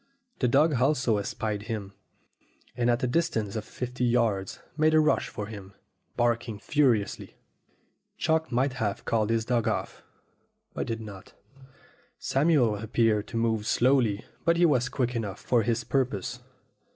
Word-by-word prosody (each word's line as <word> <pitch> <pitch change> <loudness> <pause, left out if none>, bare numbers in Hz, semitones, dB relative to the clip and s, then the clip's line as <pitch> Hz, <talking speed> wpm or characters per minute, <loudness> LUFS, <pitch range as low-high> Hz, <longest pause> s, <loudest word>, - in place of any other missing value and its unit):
The 125 - +2
dog 140 +1 +3
also 125 -5 +2
espied 105 +1 -3
him, 100 -3 -4 0.8
and 120 0 +1
at 120 +1 +1
a - - +2
distance 120 - 0
of 110 - -2
fifty 125 +2 -5
yards 115 -6 +1 0.2
made 155 +1 +3
a - - +7
rush 155 0 +2
for 105 - -5
him, 100 -2 -10 0.4
barking 120 -2 0
furiously. 120 -3 0 0.8
Chalk 160 -1 0
might 130 +2 +1
have 100 -2 -2
called 110 -2 +1
his 115 -1 +1
dog 120 -2 +1
off, - - -2 0.7
but - - -3
did 115 0 -3
not. 100 -3 -10 0.8
Samuel 135 -7 +2
appeared 110 0 +1
to 115 - -5
move 110 -2 0
slowly, 120 -5 +2 0.2
but 170 0 +3
he 175 - +5
was 125 -6 +2
quick 125 -2 -1
enough 105 -4 -3
for 120 -2 +2
his 115 +1 0
purpose. 125 -2 -1
115 Hz, 150 wpm, -27 LUFS, 110-130 Hz, 0.8 s, a